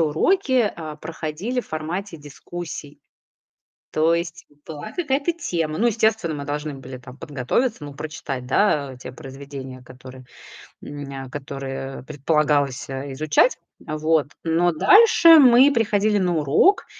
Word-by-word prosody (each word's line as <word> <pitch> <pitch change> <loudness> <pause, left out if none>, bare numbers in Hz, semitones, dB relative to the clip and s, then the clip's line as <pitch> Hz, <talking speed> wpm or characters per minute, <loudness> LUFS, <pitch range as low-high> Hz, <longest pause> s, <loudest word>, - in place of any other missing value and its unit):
уроки, 245 - +2
а, 155 -2 -7
проходили 165 +10 -4
в - - -17
формате 165 +4 -4
дискуссий. 150 0 -9 0.9
То 160 +2 +2
есть 170 0 -4 0.2
была 160 +7 -8
какая-то 290 -1 0
тема. 165 - -3
Ну 230 - +2
естественно, 220 -7 +1
мы 145 -1 -6
должны 145 +1 -4
были 130 -1 -9
там 125 +1 -13
подготовиться, 150 - -2
ну 145 - -8
прочитать, 140 -4 -6
да, 140 -3 +1
те 130 0 -9
произведения, 135 -1 -9
которые, 130 +1 -13 0.6
м, 145 0 -7 0.2
нь - - -12
которые 135 -1 -6
предполагалось, 145 -1 0
э, 135 +1 -5
изучать. 155 - +2 0.2
Вот, 155 -1 0 0.2
но 170 +2 +2
дальше 335 - +7
мы 260 +1 +7
приходили 215 -3 +1
на 180 -3 +1
урок, 155 - +3
155 Hz, 130 wpm, -22 LUFS, 140-205 Hz, 0.9 s, дальше